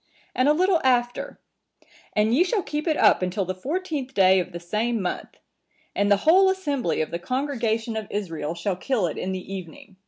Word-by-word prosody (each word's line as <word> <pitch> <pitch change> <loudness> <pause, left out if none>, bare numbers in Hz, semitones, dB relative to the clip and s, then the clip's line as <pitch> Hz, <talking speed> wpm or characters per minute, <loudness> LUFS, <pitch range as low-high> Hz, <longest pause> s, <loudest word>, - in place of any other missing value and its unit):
And 255 +3 +2
a - - +6
little 360 +1 +2
after,(954) 245 -1 -2 0.3
'And 215 +2 +2
ye 305 +8 +5
shall 385 +1 -1
keep 300 +2 -4
it 310 - +2
up - - +5
until 185 +2 -1
the 185 - -3
fourteenth 285 - -4
day 190 -1 +5
of 180 0 -4
the 175 - -6
same 220 +7 -1
month; 180 -2 -4 0.6
and 205 0 +1
the 205 - +6
whole 380 +4 +6
assembly 285 - -1
of 155 - -3
the 170 - -3
congregation 235 -1 -2
of 220 -2 -4
Israel 165 -6 -4
shall 180 +3 -2
kill 225 0 0
it 160 - -3
in 190 - -3
the 190 +1 -6
evening. 185 +1 -9
220 Hz, 195 wpm, -24 LUFS, 185-285 Hz, 0.6 s, a